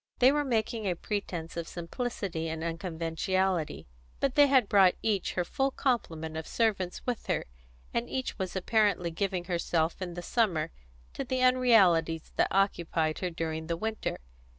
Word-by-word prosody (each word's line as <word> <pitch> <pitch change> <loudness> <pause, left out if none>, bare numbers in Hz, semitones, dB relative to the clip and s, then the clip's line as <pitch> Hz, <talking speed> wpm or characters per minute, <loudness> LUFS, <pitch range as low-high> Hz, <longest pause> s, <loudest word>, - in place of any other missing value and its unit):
They 255 +2 +6
were 295 +1 +1
making 225 -4 -1
a 180 - 0
pretence 175 -4 -4
of 170 -1 -4
simplicity 175 -2 -4
and 160 0 -4
unconventionality; 165 +1 -1 0.3
but 275 -2 +1
they 290 0 +6
had 260 -6 +4
brought 195 -3 +5
each 205 -4 0
her 180 - 0
full 270 +9 0
complement 165 - -1
of 160 0 -5
servants 200 -6 0
with 245 -3 -3
her, - - 0 0.5
and 235 +1 -1
each 260 -4 -3
was 190 -1 -3
apparently 200 -3 +2
giving 185 +1 -1
herself 170 -1 -1
in 175 -2 -4
the 175 - -6
summer 185 - +1 0.4
to - - -3
the 255 0 -1
unrealities 200 -11 +4
that - - +3
occupied 170 -5 +1
her 180 - -1
during 160 -1 -4
the 170 -1 -1
winter. 220 +4 -3
185 Hz, 160 wpm, -29 LUFS, 165-225 Hz, 0.5 s, They